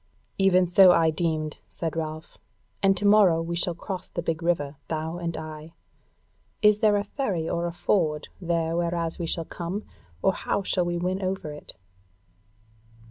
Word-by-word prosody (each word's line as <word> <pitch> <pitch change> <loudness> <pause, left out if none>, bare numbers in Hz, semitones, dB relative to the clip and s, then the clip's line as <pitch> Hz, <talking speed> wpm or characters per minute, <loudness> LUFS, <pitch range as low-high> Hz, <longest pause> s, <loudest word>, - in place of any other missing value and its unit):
"Even 185 -1 +5
so 180 +1 +7
I 165 -2 +4
deemed," 155 -2 -2
said 165 -2 -4
Ralph: 155 0 -5 0.4
"and 195 -1 +4
to 205 - -1
morrow 200 -5 +6
we 165 +1 -3
shall 175 0 0
cross 185 +2 -6
the 170 - -4
big 165 0 -2
river, 155 -4 -1
thou 160 +1 -3
and 170 -2 -3
I. 155 0 -8 0.9
Is 210 0 +6
there 210 -2 +4
a 200 - 0
ferry 200 - -2
or 170 +1 -1
a - - -3
ford 160 -3 0
there 165 -1 0
whereas 170 -1 -1
we 170 - -2
shall 165 0 -2
come, 180 +6 -5 0.4
or 190 - +4
how 200 - -2
shall 180 -2 0
we 175 0 -1
win 185 +2 -1
over 185 -4 -3
it?" 150 - -11
170 Hz, 170 wpm, -26 LUFS, 160-185 Hz, 0.9 s, so